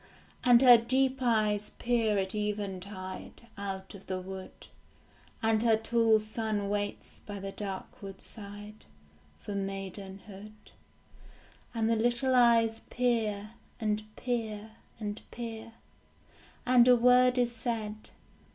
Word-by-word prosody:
And 245 Hz, 0 st, +6 dB
her 245 Hz, -2 st, +10 dB
deep 260 Hz, +3 st, +1 dB
eyes 215 Hz, -4 st, +1 dB
peer 230 Hz, -3 st, +1 dB
at 190 Hz, -1 st, -1 dB
eventide 200 Hz, -1 st, -5 dB
Out 195 Hz, -1 st, -6 dB
of 195 Hz, -1 st, -13 dB
the 185 Hz, -1 st, -2 dB
wood, 190 Hz, 0 st, -9 dB, 0.8 s
And 220 Hz, -1 st, +3 dB
her 225 Hz, -2 st, +4 dB
tall 225 Hz, 0 st, +3 dB
son 215 Hz, -1 st, -2 dB
waits 205 Hz, 0 st, -3 dB
by 205 Hz, -1 st, -5 dB
the 195 Hz, 0 st, -5 dB
dark 200 Hz, +5 st, -6 dB
woodside 205 Hz, +1 st, -9 dB, 0.6 s
For 205 Hz, -, -6 dB
maidenhood. 195 Hz, +1 st, -6 dB, 1.2 s
And 225 Hz, -1 st, +1 dB
the 230 Hz, -, +3 dB
little 240 Hz, +3 st, +2 dB
eyes 230 Hz, -2 st, +4 dB
peer, 220 Hz, -4 st, 0 dB, 0.3 s
and 215 Hz, -1 st, 0 dB
peer, 220 Hz, -3 st, -3 dB, 0.3 s
and 210 Hz, -1 st, -4 dB
peer; 230 Hz, -1 st, -7 dB, 0.9 s
And 250 Hz, -1 st, +6 dB
a 250 Hz, -, +8 dB
word 250 Hz, +1 st, +5 dB
is 240 Hz, -1 st, +1 dB
said. 220 Hz, -2 st, -4 dB
215 Hz, 115 wpm, -30 LUFS, 200-235 Hz, 1.2 s, her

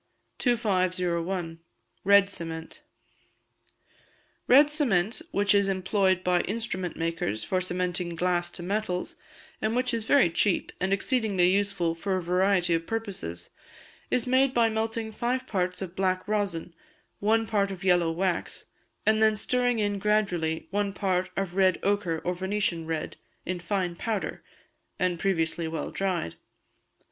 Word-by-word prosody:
2501. 185 Hz, -6 st, 0 dB, 0.4 s
Red 200 Hz, 0 st, +6 dB
Cement. 165 Hz, -4 st, -6 dB, 1.7 s
Red 290 Hz, +4 st, +7 dB
Cement 235 Hz, -, +1 dB
which 205 Hz, -, +2 dB
is 200 Hz, -1 st, +3 dB
employed 190 Hz, -1 st, +1 dB
by 180 Hz, -1 st, +3 dB
instrument 190 Hz, -5 st, -3 dB
makers 165 Hz, -11 st, -2 dB
for 185 Hz, -, 0 dB
cementing 180 Hz, -1 st, -2 dB
glass 175 Hz, 0 st, 0 dB
to 175 Hz, -, -6 dB
metals, 185 Hz, -1 st, -2 dB, 0.5 s
and 220 Hz, +1 st, 0 dB
which 250 Hz, 0 st, 0 dB
is 225 Hz, -2 st, -2 dB
very 265 Hz, -9 st, +4 dB
cheap, 180 Hz, +2 st, +1 dB
and 185 Hz, +1 st, 0 dB
exceedingly 200 Hz, -4 st, +2 dB
useful 195 Hz, -4 st, +1 dB
for 190 Hz, +3 st, -2 dB
a 185 Hz, -, -3 dB
variety 180 Hz, 0 st, +2 dB
of 165 Hz, 0 st, -1 dB
purposes, 190 Hz, -, -4 dB, 0.6 s
is 245 Hz, -, +1 dB
made 260 Hz, +1 st, +3 dB
by 230 Hz, -1 st, +4 dB
melting 220 Hz, 0 st, -2 dB
five 245 Hz, +3 st, -1 dB
parts 180 Hz, -1 st, -2 dB
of 185 Hz, -1 st, -8 dB
black 185 Hz, 0 st, 0 dB
rosin, 200 Hz, -5 st, -1 dB, 0.5 s
one 225 Hz, +2 st, +2 dB
part 200 Hz, -2 st, +1 dB
of 190 Hz, -1 st, -7 dB
yellow 175 Hz, -3 st, +3 dB
wax, 175 Hz, +1 st, -2 dB, 0.4 s
and 220 Hz, 0 st, +3 dB
then 220 Hz, -1 st, +5 dB
stirring 245 Hz, +2 st, +1 dB
in 205 Hz, -2 st, 0 dB
gradually 190 Hz, -6 st, 0 dB
one 200 Hz, 0 st, 0 dB
part 185 Hz, -2 st, 0 dB
of 195 Hz, -2 st, -2 dB
red 190 Hz, -2 st, +3 dB
ochre 200 Hz, -5 st, +1 dB
or 180 Hz, -, 0 dB
Venetian 185 Hz, -3 st, -2 dB
red, 160 Hz, -1 st, -3 dB, 0.3 s
in 180 Hz, 0 st, -2 dB
fine 180 Hz, -1 st, -2 dB
powder, 215 Hz, +3 st, -3 dB, 0.6 s
and 180 Hz, -2 st, 0 dB
previously 165 Hz, -3 st, 0 dB
well 160 Hz, -1 st, -4 dB
dried. 185 Hz, -, -1 dB
190 Hz, 140 wpm, -27 LUFS, 175-210 Hz, 1.7 s, Red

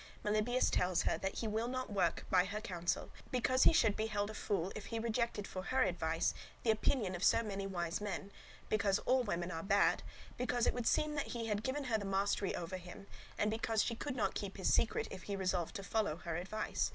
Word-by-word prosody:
Melibœus 215 Hz, +4 st, +2 dB
tells 180 Hz, -1 st, +2 dB
her -, -, +1 dB
that 195 Hz, -, -2 dB
he 225 Hz, -, -2 dB
will 220 Hz, +2 st, 0 dB
not 255 Hz, -3 st, -3 dB
work 200 Hz, -, +1 dB
by 180 Hz, -, +5 dB
her 205 Hz, +3 st, -3 dB
counsel, 175 Hz, -4 st, -2 dB, 0.2 s
because 255 Hz, +1 st, +3 dB
he -, -, +9 dB
should 225 Hz, -11 st, +4 dB
be 220 Hz, -, -1 dB
held 205 Hz, -1 st, -1 dB
a -, -, -9 dB
fool 195 Hz, -3 st, -1 dB
if 215 Hz, -, -6 dB
he 230 Hz, -, -3 dB
rejected 230 Hz, -2 st, -1 dB
for 185 Hz, -, -5 dB
her 260 Hz, +3 st, +3 dB
advice 165 Hz, -2 st, 0 dB, 0.3 s
the 225 Hz, -, +4 dB
opinion 215 Hz, -2 st, +1 dB
of 180 Hz, +1 st, -4 dB
so 230 Hz, -, +5 dB
many 200 Hz, -2 st, -3 dB
wise 175 Hz, -1 st, -2 dB
men; 200 Hz, -1 st, -4 dB, 0.4 s
because 200 Hz, -2 st, +2 dB
all 255 Hz, +1 st, +4 dB
women 180 Hz, -6 st, -2 dB
are 165 Hz, -2 st, -3 dB
bad; 200 Hz, +2 st, +3 dB, 0.4 s
because 245 Hz, -1 st, +1 dB
it -, -, +3 dB
would 245 Hz, -2 st, -2 dB
seem 305 Hz, 0 st, +2 dB
that 290 Hz, -, -2 dB
he 230 Hz, -, -2 dB
had 210 Hz, -2 st, 0 dB
given 265 Hz, +4 st, -2 dB
her 230 Hz, -4 st, +1 dB
the -, -, -5 dB
mastery 195 Hz, 0 st, +1 dB
over 175 Hz, +2 st, -4 dB
him; 180 Hz, +2 st, -10 dB, 0.3 s
and 210 Hz, +1 st, +1 dB
because 225 Hz, 0 st, +1 dB
she 235 Hz, -, -1 dB
could 255 Hz, +3 st, -4 dB
not 205 Hz, -6 st, 0 dB
keep 200 Hz, -1 st, -4 dB
his 190 Hz, -, +2 dB
secret, 230 Hz, -, +2 dB
if 185 Hz, -, -7 dB
he 200 Hz, -, -4 dB
resolved 185 Hz, -3 st, -1 dB
to 200 Hz, -, -4 dB
follow 205 Hz, -5 st, 0 dB
her 170 Hz, -1 st, -5 dB
advice. 195 Hz, +6 st, -1 dB
205 Hz, 225 wpm, -36 LUFS, 185-230 Hz, 0.4 s, he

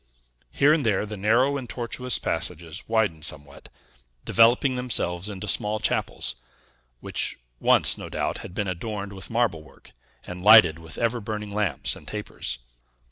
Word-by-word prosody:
Here 145 Hz, +2 st, +4 dB
and 155 Hz, -2 st, +1 dB
there 105 Hz, -3 st, +1 dB
the 105 Hz, 0 st, -6 dB
narrow 115 Hz, +8 st, +2 dB
and 125 Hz, -4 st, -7 dB
tortuous 125 Hz, +1 st, -1 dB
passages 85 Hz, -1 st, -3 dB
widened 105 Hz, -9 st, +1 dB
somewhat, 70 Hz, -1 st, -6 dB, 0.6 s
developing 120 Hz, +4 st, +4 dB
themselves 105 Hz, -7 st, -1 dB
into 105 Hz, +1 st, -6 dB
small 105 Hz, +2 st, 0 dB
chapels; 65 Hz, -, -1 dB, 0.7 s
which -, -, -3 dB, 0.2 s
once, -, -, +4 dB
no -, -, -7 dB
doubt, -, -, -2 dB
had 90 Hz, -, -10 dB
been 100 Hz, -, -1 dB
adorned 100 Hz, +2 st, -4 dB
with 95 Hz, -2 st, -8 dB
marble 115 Hz, -9 st, 0 dB
work 75 Hz, -, -18 dB, 0.3 s
and 90 Hz, 0 st, -8 dB
lighted 105 Hz, -7 st, +8 dB
with 80 Hz, -1 st, -10 dB
ever 115 Hz, 0 st, 0 dB
burning 105 Hz, -1 st, -5 dB
lamps 105 Hz, -3 st, -1 dB
and -, -, -14 dB
tapers. 105 Hz, -, -4 dB
105 Hz, 150 wpm, -25 LUFS, 90-115 Hz, 0.7 s, lighted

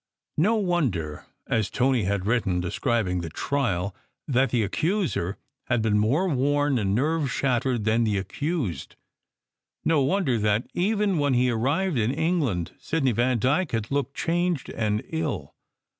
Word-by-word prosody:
No 210 Hz, +8 st, +4 dB
wonder 135 Hz, -, -1 dB, 0.2 s
(as 110 Hz, -3 st, 0 dB
Tony 125 Hz, -4 st, +1 dB
had 100 Hz, -1 st, -1 dB
written, 105 Hz, -5 st, +1 dB
describing 90 Hz, 0 st, 0 dB
the 85 Hz, -, -5 dB
trial) 100 Hz, -, -1 dB, 0.3 s
that 130 Hz, -1 st, +2 dB
the 115 Hz, -1 st, +1 dB
accuser 155 Hz, -, -1 dB, 0.3 s
had 120 Hz, -3 st, +1 dB
been 105 Hz, -1 st, +2 dB
more 140 Hz, -, +2 dB
worn 145 Hz, -2 st, +1 dB
and 100 Hz, -2 st, 0 dB
nerve 150 Hz, +3 st, +1 dB
shattered 125 Hz, -3 st, 0 dB
than 110 Hz, +2 st, +2 dB
the 105 Hz, -3 st, +1 dB
accused. 130 Hz, -, -3 dB, 0.9 s
No 160 Hz, -3 st, +3 dB
wonder 135 Hz, -, +1 dB
that, 105 Hz, +2 st, +1 dB
even 200 Hz, -1 st, +1 dB
when 145 Hz, -3 st, +2 dB
he 125 Hz, 0 st, +3 dB
arrived 140 Hz, +7 st, 0 dB
in 110 Hz, +1 st, +1 dB
England, 145 Hz, -, 0 dB
Sidney 145 Hz, -5 st, 0 dB
Vandyke 130 Hz, -, +1 dB
had 110 Hz, 0 st, -2 dB
looked 140 Hz, -1 st, -1 dB
changed 175 Hz, -2 st, 0 dB
and 105 Hz, -1 st, -1 dB
ill! 145 Hz, -, -3 dB
125 Hz, 145 wpm, -25 LUFS, 105-155 Hz, 0.9 s, No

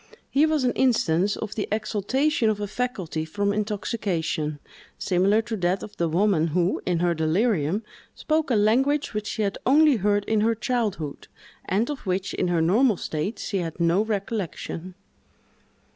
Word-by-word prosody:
Here 295 Hz, +3 st, +4 dB
was 310 Hz, -3 st, +1 dB
an 250 Hz, -, +2 dB
instance 205 Hz, -6 st, +2 dB
of 215 Hz, -, -5 dB
the 210 Hz, -, -3 dB
exaltation 220 Hz, +5 st, +1 dB
of 210 Hz, -1 st, -1 dB
a 205 Hz, -, -2 dB
faculty 200 Hz, -8 st, -3 dB
from 200 Hz, +5 st, -1 dB
intoxication, 195 Hz, -7 st, -2 dB, 0.4 s
similar 200 Hz, +4 st, +2 dB
to 225 Hz, -, -4 dB
that 180 Hz, +1 st, 0 dB
of 210 Hz, -, -9 dB
the 170 Hz, -1 st, 0 dB
woman 175 Hz, -1 st, +2 dB
who, 175 Hz, +3 st, 0 dB
in 175 Hz, -2 st, +1 dB
her 175 Hz, -1 st, +2 dB
delirium, 170 Hz, +3 st, +1 dB, 0.3 s
spoke 310 Hz, -1 st, 0 dB
a 245 Hz, -, +2 dB
language 265 Hz, +8 st, +2 dB
which 210 Hz, -1 st, -3 dB
she 215 Hz, -, -2 dB
had 200 Hz, -1 st, -2 dB
only 295 Hz, 0 st, +5 dB
heard 205 Hz, 0 st, +1 dB
in 220 Hz, -1 st, +1 dB
her 225 Hz, +1 st, +2 dB
childhood, 210 Hz, -, -2 dB, 0.4 s
and 205 Hz, +6 st, +1 dB
of 290 Hz, -, -5 dB
which, 185 Hz, +2 st, -1 dB
in -, -, 0 dB
her 175 Hz, -2 st, +1 dB
normal 215 Hz, +5 st, +3 dB
state, 160 Hz, +9 st, -3 dB
she 195 Hz, -, -2 dB
had 165 Hz, -2 st, -5 dB
no 170 Hz, +4 st, +3 dB
recollection. 195 Hz, -4 st, -4 dB
205 Hz, 165 wpm, -25 LUFS, 175-225 Hz, 0.4 s, only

